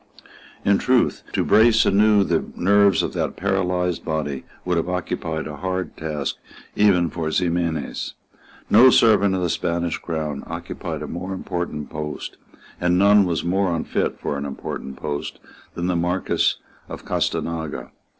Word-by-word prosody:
In 100 0 +4
truth 125 -1 +2
to - - +1
brace 110 +2 +5
anew 105 0 +4
the - - 0
nerves 100 0 +4
of - - -3
that - - -2
paralysed 90 -2 0
body 75 -4 -3 0.2
would 90 -1 +1
have 85 - 0
been 80 -3 -3
a 75 -1 -7
hard 95 +1 -3
task 75 -3 -3 0.4
even 90 -6 +3
for 80 -2 -3
Ximenes. 85 -3 -1 0.5
No 120 +5 +7
servant 105 -5 +4
of 90 - -1
the - - +2
Spanish 85 -1 -1
Crown 75 -4 -4
occupied - - -5
a - - -5
more 90 +3 -5
important 85 -5 -4
post, 75 -1 -5 0.4
and 90 0 +2
none 100 +1 +6
was 85 -2 -1
more 95 +1 +1
unfit 80 - -2
for 70 - -3
an 70 - -4
important 70 -1 -6
post, 75 0 -4 0.4
than 85 - -3
the 90 0 0
Marquess 90 +2 +1 0.3
of - - -8
Gastanaga. 80 -2 -2
90 Hz, 150 wpm, -22 LUFS, 80-95 Hz, 0.5 s, No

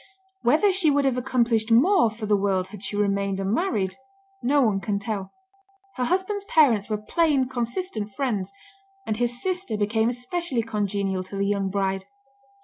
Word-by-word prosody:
Whether 315 +11 +3
she 365 -4 +4
would 285 -1 +2
have 265 -2 +2
accomplished 235 -3 +1
more 305 - +5
for 220 0 -7
the 210 0 +3
world 195 -2 0
had 205 -1 -10
she 205 0 -4
remained 200 -1 0
unmarried, 195 - -1 0.4
no 280 +2 +3
one 210 -4 +2
can 205 0 -2
tell. 200 -2 -4 0.6
Her 250 - -1
husband's 380 +5 -1
parents 255 - +3
were 215 - 0
"plain, 275 +4 +1
consistent 240 - -3
friends," 210 -5 -2 0.5
and 215 - -2
his 240 +1 -1
sister 365 - -2
became 220 +2 +1
especially 250 +1 -2
congenial 200 -3 -1
to 195 - -9
the 200 0 0
young 200 -1 0
bride. 195 -1 -1
225 Hz, 160 wpm, -25 LUFS, 200-270 Hz, 0.6 s, more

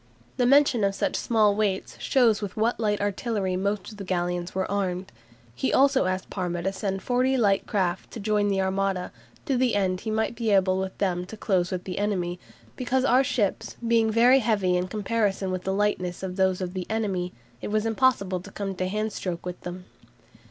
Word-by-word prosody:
The 245 - +3
mention 275 -4 +5
of 195 0 +1
such - - -1
small 215 -3 +3
weights 200 -3 -1
shows 235 -6 +3
with 205 -1 -5
what 225 +2 +1
light 210 -2 +1
artillery 205 -1 -1
most 200 +3 -2
of 210 - -12
the 200 - -6
galleons 175 -1 -2
were 190 0 0
armed. 190 -2 -2 0.4
He 265 - -1
also 275 -3 +4
asked 185 0 -3
Parma 175 -3 -3
to 195 +1 -1
send 195 -1 -3
forty 255 +2 +2
light 200 -4 +2
craft 190 -3 -1
to - - -8
join 210 0 +1
the 195 -1 +1
Armada, 190 -1 -1 0.3
"to 275 -4 +1
the 250 -3 +2
end 185 -2 +1
he 225 - -4
might 220 +2 0
be 230 -1 -1
able 190 -2 +3
with 190 0 -4
them 180 -2 -1
to 220 - -9
close 185 -4 +1
with 185 -1 -3
the 185 0 -4
enemy, 180 -4 -1 0.4
because 255 +1 0
our 260 +1 +5
ships 215 -6 -1
being 230 -1 +3
very 240 +4 +5
heavy 205 -6 +1
in 180 +1 0
comparison 205 -1 -1
with 185 -1 -4
the 190 - 0
lightness 190 -3 -1
of 185 -1 -4
those 190 -1 +1
of 180 -1 -3
the 185 -2 -4
enemy, 195 -5 -1 0.3
it - - -4
was 215 +1 0
impossible 225 -5 +2
to 185 - -11
come 195 -1 -4
to 185 - -1
hand 215 +2 -2
stroke 175 -2 -4
with 180 0 -6
them." 180 +1 -7
200 Hz, 205 wpm, -26 LUFS, 185-220 Hz, 0.4 s, mention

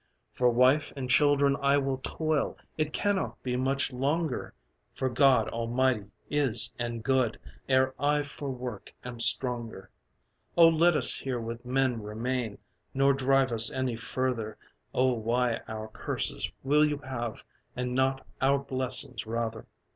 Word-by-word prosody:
"For 125 -1 +3
wife 130 +5 +3
and 135 -2 -4
children 145 0 +4
I 140 +1 +3
will 135 -1 -1
toil: 155 +1 -1 0.2
It 155 -1 -1
cannot 205 +2 -1
be 125 -1 -2
much 135 +1 0
longer 140 - -2 0.4
(For 130 - -1
God 135 +1 +4
almighty 115 -2 0 0.2
is 125 -7 0
and 120 -1 -4
good!) 130 -3 +1 0.3
Ere 130 0 +3
I 145 +1 +2
for 145 0 -6
work 125 -5 -7
am 120 -1 -7
stronger. 115 -5 +3 0.7
Oh 165 -1 +8
let 165 +1 +3
us - - +3
here 130 -3 -3
with 115 +1 -6
men 130 -2 0
remain, 110 +1 -3 0.4
Nor 135 +1 +4
drive 135 -1 +2
us 115 +1 +2
any 130 -2 -2
further! 115 -2 -2 0.3
Oh 130 0 +2
why 120 +1 0
our 110 0 -6
curses - - -2
will 150 +3 +4
you 150 -1 +1
have, 120 -4 -5 0.3
And 125 0 -3
not 135 +1 0 0.2
our 135 +1 +4
blessings 130 -4 -1
rather!" 115 0 -3
130 Hz, 145 wpm, -28 LUFS, 120-140 Hz, 0.7 s, Oh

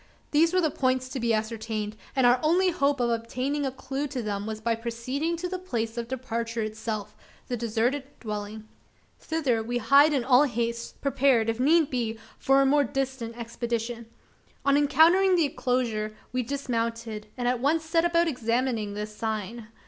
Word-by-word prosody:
These 325 +3 +4
were 370 0 +3
the 315 -3 +1
points 255 -1 0
to 260 - -4
be 235 -1 +1
ascertained; 220 -1 -2 0.2
and 260 -2 +3
our 245 +1 +5
only 360 +4 +3
hope 280 -3 +1
of 240 -1 +1
obtaining 255 +5 -1
a - - -2
clue 270 +2 -4
to 260 -4 -4
them 205 -1 -3
was 220 -1 -4
by 230 +1 0
proceeding 245 +8 -3
to 360 +2 -3
the 370 0 -4
place 230 -11 -3
of 235 -1 -4
departure 235 -3 -3
itself 215 -1 -4 0.3
the 245 - 0
deserted 235 +4 0
dwelling. 210 0 -6 0.5
Thither 280 -8 0
we 240 +2 -2
hied 275 +6 +5
in 275 -4 +1
all 255 +3 +5
haste 235 -2 -3
prepared, 265 -4 +3
if 225 - -7
need 310 +3 +4
be, 230 -3 -2 0.2
for 270 +1 +4
a - - +2
more 285 +2 +4
distant 265 -3 -3
expedition. 235 0 -4 0.6
On 280 0 +4
entering 330 +7 +5
the 335 -3 +3
enclosure, 235 -6 -1 0.2
we 255 - +1
dismounted, 230 -4 -3
and 245 -1 -1
at 250 0 +1
once 315 +5 +1
set 330 +1 +2
about 340 0 +3
examining 230 -5 -1
the 210 0 -3
"sign." 215 +1 -4
245 Hz, 175 wpm, -27 LUFS, 225-280 Hz, 0.6 s, our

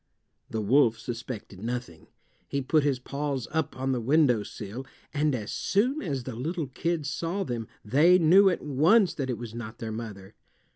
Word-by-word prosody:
The 110 - -2
wolf 115 +1 +4
suspected 115 -5 -7
nothing. 120 -8 -5 0.4
He 140 - -1
put 150 +3 +3
his 140 -3 +1
paws 140 0 -3
up 155 -3 -1
on 130 +1 -1
the 125 -2 0
windowsill, 120 -4 +1 0.3
and 150 -1 +1
as 105 -4 -5
soon 250 +9 +1
as 140 -8 -3
the 125 -2 -6
little 160 +7 -2
kids 160 +2 -2
saw 170 +7 -2
them 120 - -4 0.2
they 155 +11 +5
knew 185 +4 +6
at 180 - -2
once 165 - +4
that 135 -3 -3
it 125 - -1
was 120 -2 -7
not 115 -1 -7
their 110 -1 -5
mother. 105 -3 -7
130 Hz, 175 wpm, -27 LUFS, 115-155 Hz, 0.4 s, knew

